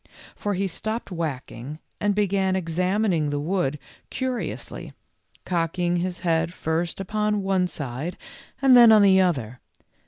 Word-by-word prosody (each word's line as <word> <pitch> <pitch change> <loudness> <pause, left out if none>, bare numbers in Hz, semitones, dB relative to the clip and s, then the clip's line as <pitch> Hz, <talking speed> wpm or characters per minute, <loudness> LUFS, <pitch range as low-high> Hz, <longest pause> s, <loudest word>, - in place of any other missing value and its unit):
For 205 -1 -2
he 195 +1 0
stopped 220 +5 -4
whacking 150 -4 -5 0.2
and 205 -1 +1
began 195 -2 +1
examining 180 -1 0
the 145 0 -2
wood 155 -2 -1 0.3
curi 260 -1 -2
ously, - - -8 0.5
cocking 175 0 0
his 180 +1 -3
head 165 -1 +1
first 165 0 -2
upon 210 +1 -1
one 190 -1 +1
side 145 +1 -5 0.5
and 265 -2 +7
then 235 -2 +9
on 215 -2 +7
the 190 -1 +6
other. 130 -10 -1
180 Hz, 135 wpm, -24 LUFS, 160-200 Hz, 0.5 s, then